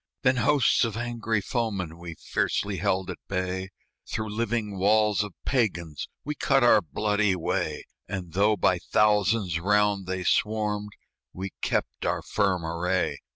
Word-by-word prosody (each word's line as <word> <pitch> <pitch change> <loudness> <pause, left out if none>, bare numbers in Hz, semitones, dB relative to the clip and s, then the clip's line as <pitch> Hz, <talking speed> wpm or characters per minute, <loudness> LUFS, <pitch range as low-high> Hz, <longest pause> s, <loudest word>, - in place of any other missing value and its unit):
Then 130 -1 +3
hosts 125 +2 +3
of 115 -2 -1
angry 115 -2 -1
foemen 100 -8 -2
We 85 -1 -7
fiercely - - -1
held 95 0 0
at - - -8
bay, 95 0 -2 0.4
Through 110 -1 -3
living 110 -3 -2
walls 105 0 +3
of 105 -3 -8
Pagans 85 - -1 0.2
We 150 - -2
cut 135 -2 +2
our 110 -3 +6
bloody 105 +5 +1
way; 85 - -2 0.2
And 90 -4 -5
though 105 +3 +3
by 90 -1 +2
thousands 105 -2 +2
round 100 +1 +2
they 95 0 -2
swarmed, 105 +1 0 0.4
We 95 +1 -5
kept - - -1
our - - -1
firm 95 -5 0
array. 90 +3 -1
105 Hz, 145 wpm, -26 LUFS, 90-110 Hz, 0.4 s, our